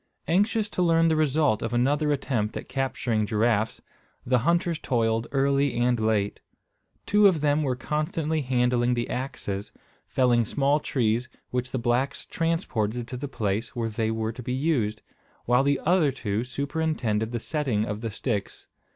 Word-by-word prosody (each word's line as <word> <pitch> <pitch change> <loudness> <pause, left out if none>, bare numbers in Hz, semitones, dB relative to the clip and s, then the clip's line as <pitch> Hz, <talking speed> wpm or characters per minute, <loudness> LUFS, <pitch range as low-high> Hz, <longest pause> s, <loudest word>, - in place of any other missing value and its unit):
Anxious 205 +5 +2
to 185 - -2
learn 165 -1 +4
the 160 - +2
result 150 -6 +2
of 115 +1 -3
another 145 +5 +2
attempt 125 -7 -1
at - - -7
capturing 120 -5 -1
giraffes, 110 0 +1 0.4
the 125 0 +3
hunters 170 +4 +1
toiled 115 -4 0
early 140 0 +2
and 120 0 +2
late. 110 -2 0 0.7
Two 210 0 +5
of 170 -6 +2
them 150 0 +2
were 130 -4 0
constantly 155 +3 -1
handling 125 -1 +1
the 120 0 -1
axes, 105 -6 -4 0.4
felling 120 -2 +3
small 140 +5 +1
trees, 120 -3 0 0.2
which 125 0 -2
the 130 - -2
blacks 120 +3 0
transported 125 - -1
to 130 - -5
the 140 +3 -4
place 110 -3 -2
where 115 -2 -1
they 110 0 -1
were 110 0 -1
to 115 - -9
be 125 +1 -3
used, 130 -7 0 0.4
while 125 +2 +4
the 140 0 +2
other 165 -4 +4
two 110 -4 -2
superintended 130 -5 -1
the 120 - -2
setting 125 -6 -1
of 105 0 -4
the 115 - -2
sticks. 105 -1 -3
125 Hz, 160 wpm, -26 LUFS, 115-150 Hz, 0.7 s, Two